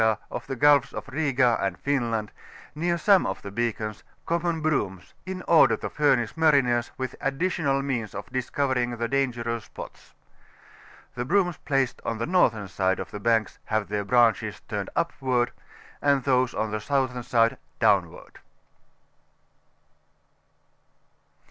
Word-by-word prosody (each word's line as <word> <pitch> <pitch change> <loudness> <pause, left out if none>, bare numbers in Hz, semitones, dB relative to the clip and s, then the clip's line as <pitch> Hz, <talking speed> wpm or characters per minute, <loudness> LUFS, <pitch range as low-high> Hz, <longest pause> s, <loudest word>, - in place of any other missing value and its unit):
of - - -6
the 135 - -3
Gtdfs 145 0 +4
of - - -5
Biga 130 -4 +1
and 95 -2 -1
Finland, 115 -6 -1 0.4
near 170 +3 0
aome 195 +3 +4
of 95 - -4
the 100 - -7
beacons, 110 -1 -3 0.2
common 170 0 0
brooms, 105 - -2
in 185 -1 -5
order 140 -9 +5
to - - -6
furnish 130 -6 +2
mariners 135 -7 +3
with 130 -1 -4
additicmal 140 -1 0
means 120 -6 -3
of - - -5
cBscovering 130 -1 -1
the 115 0 -1
dangerous 120 -4 -1
spots. - - -11 1.0
The 120 - -3
brooms 175 +3 +1
placed 135 -3 -1
on 115 - -2
tlie 115 +7 -3
northern 115 - +2
side 95 +1 0
of - - -6
the 105 - -6
banks 110 -3 +1
have 110 -1 -1
tl^ 100 -1 -2
branches 120 -2 +2
turned - - -3
upward, 125 -2 0 0.5
and 140 -2 +2
those 130 -2 +2
on 110 -1 -1
the 110 0 -3
southern 130 0 0
side, 115 -1 +2 0.2
downward. - - +1
125 Hz, 135 wpm, -26 LUFS, 115-145 Hz, 1.0 s, order